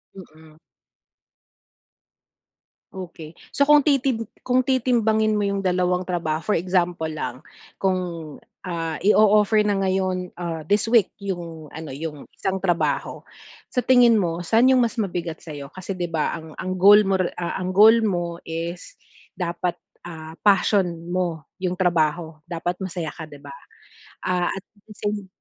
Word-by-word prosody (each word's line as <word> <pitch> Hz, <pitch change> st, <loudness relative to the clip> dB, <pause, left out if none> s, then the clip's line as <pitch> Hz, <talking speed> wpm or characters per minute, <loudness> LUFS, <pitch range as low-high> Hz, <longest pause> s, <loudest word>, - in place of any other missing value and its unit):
Mm. 160 Hz, -4 st, -15 dB, 2.4 s
Okey, 170 Hz, -4 st, -9 dB, 0.2 s
so 280 Hz, -, +2 dB
kung 295 Hz, 0 st, +7 dB
titim 260 Hz, -6 st, +1 dB, 0.2 s
kung 255 Hz, 0 st, +3 dB
titimbangin 230 Hz, -4 st, +2 dB
mo 210 Hz, -, +1 dB
yung 200 Hz, -1 st, -1 dB
dalawang 180 Hz, 0 st, +1 dB
trabaho, 165 Hz, -3 st, -2 dB
for 210 Hz, -, +1 dB
example 175 Hz, -2 st, 0 dB
lang 130 Hz, -5 st, -5 dB, 0.4 s
kung 175 Hz, -5 st, -2 dB, 0.2 s
ah, 165 Hz, -3 st, -4 dB
i-o-offer 210 Hz, +2 st, +5 dB
na 205 Hz, -1 st, +2 dB
ngayon, 185 Hz, -1 st, 0 dB
ah, 170 Hz, -2 st, -4 dB
this 205 Hz, +1 st, +3 dB
week 225 Hz, -4 st, +4 dB
yung 170 Hz, -6 st, -6 dB
ano, 160 Hz, -1 st, -7 dB
yung 150 Hz, +1 st, -7 dB
isang 190 Hz, 0 st, -2 dB
trabaho. 175 Hz, -3 st, -1 dB, 0.5 s
Sa 250 Hz, -, +2 dB
tingin 245 Hz, -1 st, +6 dB
mo, 175 Hz, -5 st, 0 dB
saan 230 Hz, +8 st, +4 dB
yung 260 Hz, -, +5 dB
mas 230 Hz, -, -3 dB
mabigat 175 Hz, -5 st, -4 dB
sa'yo 145 Hz, -3 st, -9 dB
kasi 185 Hz, 0 st, -6 dB
di 175 Hz, -, -1 dB
ba 165 Hz, -1 st, -1 dB
ang 160 Hz, -1 st, -11 dB
ang 185 Hz, 0 st, -4 dB
goal 205 Hz, +3 st, +8 dB
mo 195 Hz, -2 st, +1 dB
re 185 Hz, -2 st, -1 dB
ang 180 Hz, +1 st, -3 dB
goal 215 Hz, +4 st, +8 dB
mo 175 Hz, -4 st, -1 dB
is 170 Hz, -, -5 dB, 0.4 s
dapat, 175 Hz, 0 st, -2 dB, 0.3 s
ah, 160 Hz, -1 st, -9 dB
passion 200 Hz, -1 st, +4 dB, 0.2 s
mo 175 Hz, -4 st, -2 dB
yung 185 Hz, -2 st, -2 dB
trabaho, 170 Hz, -3 st, 0 dB
dapat 175 Hz, +1 st, -3 dB
masaya 180 Hz, -4 st, -4 dB
ka, 160 Hz, -, -8 dB
di 145 Hz, -2 st, -13 dB
ba? 145 Hz, -, -11 dB, 0.7 s
Ah, 180 Hz, -1 st, 0 dB
at 195 Hz, -, -6 dB, 0.3 s
same 205 Hz, -1 st, -3 dB
180 Hz, 145 wpm, -23 LUFS, 165-205 Hz, 2.4 s, goal